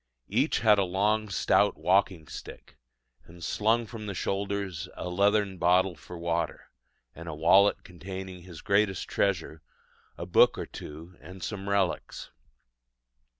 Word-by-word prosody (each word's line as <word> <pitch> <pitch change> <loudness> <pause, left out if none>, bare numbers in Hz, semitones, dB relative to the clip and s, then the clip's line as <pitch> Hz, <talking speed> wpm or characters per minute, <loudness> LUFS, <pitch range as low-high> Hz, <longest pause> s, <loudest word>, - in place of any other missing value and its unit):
Each - - +1
had 105 -2 +5
a - - +3
long 105 +4 0
stout 100 +1 +2
walking 90 -1 +1
stick: - - -10 0.5
and 85 +1 -13
slung 115 +6 +1
from 110 -1 -8
the 100 - -4
shoulder 100 +2 -2 0.3
a - - -5
leathern 100 +1 +1
bottle 90 +1 +3
for 80 +4 -11
water, 85 0 -3 0.4
and 85 +1 -9
a 80 - -5
wallet 95 +6 +4
containing 95 0 -8
his 85 -4 -11
greatest 100 -2 +1
treasure 80 -5 -1 0.6
a - - -5
book - - +4
or - - -4
two 80 +4 -10
and 95 +2 -11
some 100 +1 -4
relics. 100 -3 -1
95 Hz, 140 wpm, -28 LUFS, 85-100 Hz, 0.6 s, had